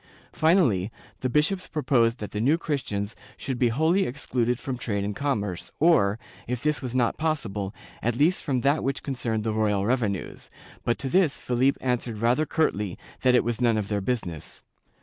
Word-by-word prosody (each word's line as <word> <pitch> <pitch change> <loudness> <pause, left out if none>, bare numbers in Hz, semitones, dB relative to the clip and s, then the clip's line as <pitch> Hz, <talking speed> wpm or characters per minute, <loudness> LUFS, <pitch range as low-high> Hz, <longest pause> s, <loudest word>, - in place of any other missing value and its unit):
Finally, 130 - +3 0.3
the 130 - -1
bishops 155 +8 +1
proposed 125 -6 +2
that 105 - -6
the 105 - -2
New 145 +8 +4
Christians 115 -10 -3 0.2
should 130 -3 -4
be 125 - +4
wholly 160 +11 +2
excluded 125 -2 -1
from 130 +1 -4
trade 105 -5 -2
and 100 0 -3
commerce 105 -10 -2
or, 115 -11 +4 0.3
if 125 +2 -3
this 150 0 +1
was 130 -2 -5
not 120 -2 +2
possible, 110 -12 -1 0.3
at 120 0 0
least 155 +8 +3
from 130 -3 0
that 140 +4 +2
which 135 +1 -2
concerned 120 -5 -2
the 110 -1 -1
royal 105 -2 +1
revenues, 110 -5 -2 0.3
but 120 - +1
to 135 - -3
this 165 +1 +3
Philip 125 +3 +1
answered 125 -3 -1
rather 120 +8 +2
curtly 105 - 0 0.2
that 125 -1 +4
it - - +4
was 120 0 -2
none 115 -2 +3
of 105 -2 -2
their 105 -1 0
business. 95 - -4
125 Hz, 180 wpm, -26 LUFS, 105-140 Hz, 0.3 s, New